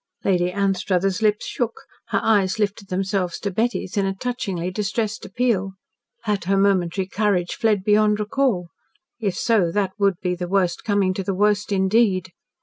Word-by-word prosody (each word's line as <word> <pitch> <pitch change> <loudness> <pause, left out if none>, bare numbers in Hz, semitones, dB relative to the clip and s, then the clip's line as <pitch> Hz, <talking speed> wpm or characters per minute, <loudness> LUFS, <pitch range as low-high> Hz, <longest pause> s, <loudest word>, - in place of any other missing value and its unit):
Lady 180 -2 +2
Anstruthers' 195 0 0
lips 210 -1 +2
shook, 235 -2 -3 0.3
her - - +1
eyes 200 -3 +2
lifted 205 -1 -2
themselves 190 -1 -1
to 200 - -3
Betty's 225 -1 -1
in 200 - +2
a 195 - -2
touchingly 195 -6 -3
distressed 215 +2 -2
appeal. 195 -3 0 0.5
Had 210 -5 -1
her 195 +2 +2
momentary 190 -2 +2
courage 195 -3 0
fled 210 -4 +1
beyond 210 +1 +3
recall? 210 -5 0 0.5
If 200 -5 -1
so, 205 -8 +2
that 195 0 0
would 200 -2 +3
be 180 -1 -1
the 180 0 -4
worst 185 -3 +1
coming 200 -3 +1
to 195 - -3
the 195 0 -2
worst, 210 +1 +1
indeed. 190 -1 +2
195 Hz, 160 wpm, -22 LUFS, 185-210 Hz, 0.5 s, beyond